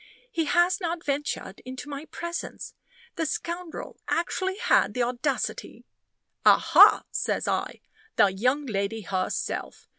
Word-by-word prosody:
"He 330 -8 0
has 350 +5 +3
not 340 -1 -2
ventured 280 -8 -3
into 255 +2 -8
my 285 +1 -6
presence. 340 +1 -6 0.4
The 325 -2 0
scoundrel 340 +2 -5
actually 375 +3 -1
had - - +2
the 250 - +1
audacity 250 +4 -3 0.3
" - - -54
"Aha!" - - +6
says - - -1
I. - - -2 0.3
"The 195 - +4
young 255 +9 +1
lady 210 -1 -2
herself! 185 -2 -3
290 Hz, 125 wpm, -26 LUFS, 240-340 Hz, 0.4 s, Aha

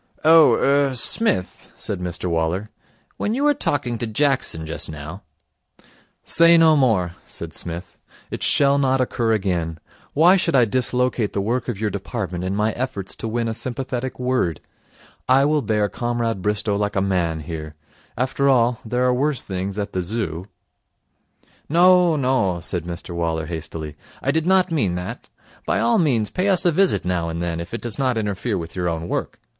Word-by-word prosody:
'Oh 160 0 +7
er 140 -1 +2
Smith,' 125 - +1
said 100 - -4
Mr 90 -1 -5
Waller, 85 +5 -1 0.5
'when 215 - -1
you 275 - -1
were 295 0 +4
talking 135 - -1
to 120 - -2
Jackson 120 - 0
just 80 +1 -5
now 80 +5 -8 0.7
' - - -32
'Say 170 +1 +5
no 160 -1 +6
more,' 110 - +2 0.2
said - - -7
Psmith. 85 +1 -7 0.3
'It - - -5
shall 140 0 +3
not 135 -1 +2
occur 120 -2 0
again. 90 -6 -1 0.3
Why 175 +6 +6
should 170 -4 0
I 125 -3 +5
dislocate 125 -1 0
the - - -1
work 120 +4 -1
of 110 -5 -4
your 105 -1 -1
department 95 -3 -4
in 95 +1 -2
my 105 +2 +1
efforts 110 -6 -4
to - - -5
win 115 +1 -1
a 115 - -2
sympathetic 130 +1 -4
word? 125 - 0 0.7
I 135 +2 +5
will 150 0 +2
bear 105 -4 +1
Comrade 120 -2 -2
Bristow 105 +1 0
like 105 0 -1
a - - +2
man 85 -5 0
here. 75 -1 -7 0.4
After 130 +3 +1
all, 120 -2 +3
there 125 +2 -1
are 125 - +3
worse 140 +2 0
things 95 +1 -4
at 100 0 -4
the 95 - -1
Zoo.' 90 -3 -4 1.2
'No, 175 +1 +5
no,' 125 - +1
said 85 -1 -4
Mr 85 0 -7
Waller 80 -2 -2
hastily, 80 -2 -6 0.3
'I 135 - +2
did 160 +2 -1
not 190 -2 +3
mean 105 - 0
that. 90 0 -6 0.4
By - - +1
all 115 +1 +3
means 120 - +1
pay 185 +2 -1
us 185 -2 +3
a 175 - +5
visit 190 +4 +2
now 90 -2 -1
and 85 0 -4
then, 85 -1 -2
if 85 0 -7
it 115 - -5
does 120 0 -4
not 130 -3 +1
interfere 105 +1 -2
with 85 -1 -7
your 90 -1 -1
own 80 0 -4
work. - - -3
110 Hz, 180 wpm, -22 LUFS, 90-135 Hz, 1.2 s, Oh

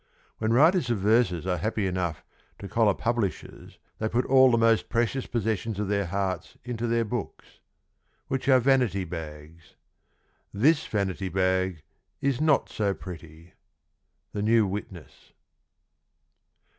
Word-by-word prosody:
When 110 0 0
writers 155 +3 +4
of 120 - +1
verses 100 -4 +2
are 90 -1 0
happy 110 -1 -1
enough 90 -4 -2 0.3
to 100 - -8
collar 105 0 +2
publishers 115 -8 -3 0.2
they 110 - -1
put 120 +3 0
all 130 0 +6
the 120 - +3
most 115 -1 +2
precious 120 +3 -1
possessions 110 -2 -2
of 105 -2 -2
their 100 -2 0
hearts 95 +1 -3
into 120 -1 -3
their 115 0 +1
books 120 -1 -6 0.3
— - - -45
which 135 0 -2
are 130 -1 +6
vanity 125 -7 +2
bags.... 80 -1 -9 0.8
[This] 145 +10 +2
vanity 95 -2 -2
bag 95 -2 0 0.4
[is] 140 -1 0
not 155 -2 +3
so 100 -2 -1
pretty. 85 -1 -11 0.4
— - - -50
The 105 - -3
New 110 +1 +3
Witness. 95 -4 -8
105 Hz, 140 wpm, -26 LUFS, 95-120 Hz, 0.8 s, all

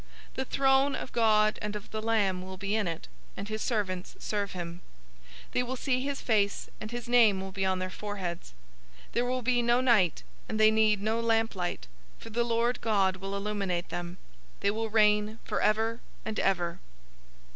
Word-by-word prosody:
The - - -2
throne 270 +1 +3
of - - -6
God 215 -2 +3
and 210 0 -3
of 210 - -7
the 215 - -3
Lamb 205 -5 +1
will 190 0 -8
be 200 +2 -1
in 215 -4 +1
it, 165 - -5 0.3
and 200 - -5
his 215 0 -3
servants 190 -6 -2
serve 205 -2 -2
him. 175 -1 -6 0.7
022:004 - - -28
They - - +1
will 250 +1 -3
see 255 0 0
his 275 +1 -3
face, 205 -4 +1
and 215 - -6
his 240 0 -5
name 230 -5 +5
will 190 0 -5
be 190 0 -1
on 190 0 +1
their 185 0 -3
foreheads. 185 - -5 0.5
022:005 - - -27
There 240 - +1
will 255 +1 -1
be 245 0 +3
no 240 +1 +3
night, 225 - +3 0.3
and 215 - -2
they 215 0 +7
need 215 -2 +3
no 220 +2 +1
lamp 225 0 +2
light; 175 - -3 0.3
for 225 - -11
the 235 +2 +1
Lord 235 +1 0
God 195 -4 +2
will 195 +1 -5
illuminate 200 -4 -2
them. 175 +1 -5 0.4
They 200 - +3
will 225 +1 -2
reign 210 0 +3
forever 225 +2 +1 0.3
and 220 -1 -2
ever. 175 -2 0
215 Hz, 190 wpm, -29 LUFS, 190-230 Hz, 0.7 s, they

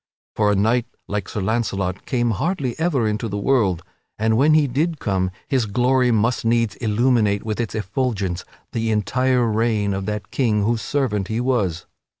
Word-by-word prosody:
For 105 -1 +3
a - - +2
knight 115 +4 +2 0.2
like 100 -2 -3
Sir 105 - -3
Launcelot 95 -3 -2
came 120 -3 +1
hardly 135 - -1
ever 150 -9 +1
into 105 +2 -2
the 100 -1 -3
world, 100 -7 +1 0.3
and 110 +1 +2
when 145 +6 +4
he 155 -2 +4
did 150 +5 -1
come 95 -3 0 0.2
his 130 -5 +1
glory 125 +4 +2
must 115 +1 +1
needs 115 -2 +2
illuminate 110 -2 +2
with 110 0 -3
its 115 -2 -2
effulgence 105 -3 -2 0.3
the 115 0 -1
entire 125 +4 +1
reign 110 -2 +1
of 95 0 -3
that 105 -1 -4
king 110 -6 +1
whose 115 +1 0
servant 105 -6 -1
he 110 +2 -2
was. 105 -10 0
110 Hz, 170 wpm, -21 LUFS, 105-125 Hz, 0.3 s, when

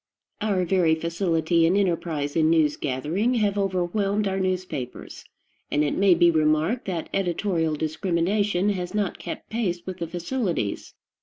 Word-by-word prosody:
Our 200 -4 +1
very 170 -3 +3
facility 165 0 +1
and 185 +4 +2
enterprise 165 -6 -1
in 160 -1 +3
news 155 -3 +3
gathering 155 - -1
have 205 -3 +1
overwhelmed 195 +2 0
our 190 0 -1
newspapers, 185 -9 -4 0.5
and 150 - +1
it 145 - 0
may 195 -2 +5
be 170 0 +5
remarked 155 +8 +1
that 175 -4 -3
editorial 175 -4 0
discrimination 180 +5 0
has 185 -1 -3
not 205 -3 -1
kept - - -7
pace 185 -7 -2
with 185 -1 -6
the 170 - -3
facilities. 175 - -3
175 Hz, 145 wpm, -25 LUFS, 160-195 Hz, 0.5 s, may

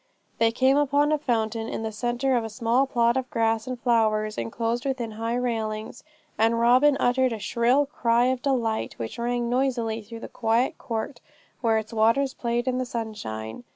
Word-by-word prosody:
They 225 0 +4
came 260 +3 +3
upon 290 +1 +2
a 305 - +2
fountain 225 -4 -1
in - - -4
the 220 - -3
centre 240 +4 0
of 235 - +1
a 225 - -5
small 235 +4 +1
plot 235 -1 +2
of 260 -1 -3
grass 225 0 0
and 255 -1 -4
flowers, 215 -3 +1
enclosed 230 - -2
within 260 -5 -2
high 225 +2 -3
railings; 225 -2 -3 0.4
and 225 +1 +3
Robin 255 +5 +5
uttered 255 +1 +2
a 225 - -3
shrill 235 +6 +2
cry 240 -4 +1
of 255 0 0
delight, 240 -5 -1
which 115 - -6
rang 240 0 -1
noisily 240 -3 0
through 230 +2 -10
the - - -6
quiet 230 +3 0
court 230 +3 -4 0.4
where 225 -3 +2
its 220 +1 -4
waters 230 +5 +2
played 240 +1 -2
in 255 0 0
the 255 - -1
sunshine. 210 - -5
235 Hz, 185 wpm, -25 LUFS, 225-255 Hz, 0.4 s, Robin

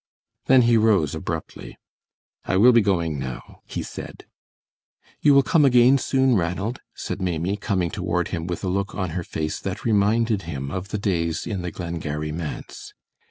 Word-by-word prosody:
Then 130 -1 +6
he 115 0 +4
rose 105 -10 +3
abruptly. - - -6 0.7
"I 95 - +1
will 120 +6 +7
be 120 -1 +5
going 85 -7 0
now," 65 -2 -7
he - - -4
said. - - -9 1.0
"You 145 -2 +5
will 140 - +6
come 160 +1 +3
again 125 0 +5
soon, 130 -1 +2
Ranald," 95 +6 -1 0.2
said - - -5
Maimie, 90 +1 -1
coming 95 -5 -1
toward 90 0 -1
him 85 -2 -4
with 90 +2 -4
a - - -1
look 100 +2 -2
on 95 -4 -2
her 90 +1 -3
face 80 -1 -3
that 95 +1 -5
reminded 110 0 +2
him 70 -3 -4
of 95 +3 -4
the 105 - -3
days 85 -5 -1
in 100 -5 -3
the 90 - -3
Glengarry 80 -3 -4
manse. 80 -1 -7
95 Hz, 170 wpm, -23 LUFS, 85-115 Hz, 1.0 s, will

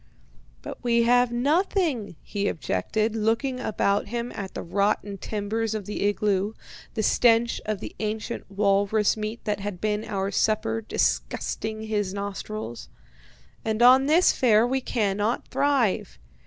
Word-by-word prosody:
'" - - -30
"'But - - -8
we 235 -1 +3
have 245 +1 +4
nothing,' 285 - 0
he 205 -1 -2
objected, 215 - -1
looking 230 +4 0
about 205 -4 0
him 235 +2 -3
at 195 -2 -6
the - - -4
rotten 200 +2 0
timbers 220 +2 -2
of 210 -3 -4
the 210 - -4
igloo, 205 0 +1 0.4
the 220 - 0
stench 235 +1 +3
of 215 -3 -2
the - - -7
ancient 220 +1 -4
walrus 200 +1 +2
meat 215 +1 -5
that 210 -1 -1
had 200 -2 -5
been 210 +1 -1
our 195 -2 -2
supper 225 +2 +1
disgusting 220 0 -2
his 205 -3 -2
nostrils. 200 - -5 0.7
'And 220 +1 0
on 260 +2 +7
this 330 +4 +5
fare 225 -3 +4
we 265 +2 0
cannot 210 -1 -1
thrive. 240 -9 +1
215 Hz, 140 wpm, -25 LUFS, 200-235 Hz, 0.7 s, on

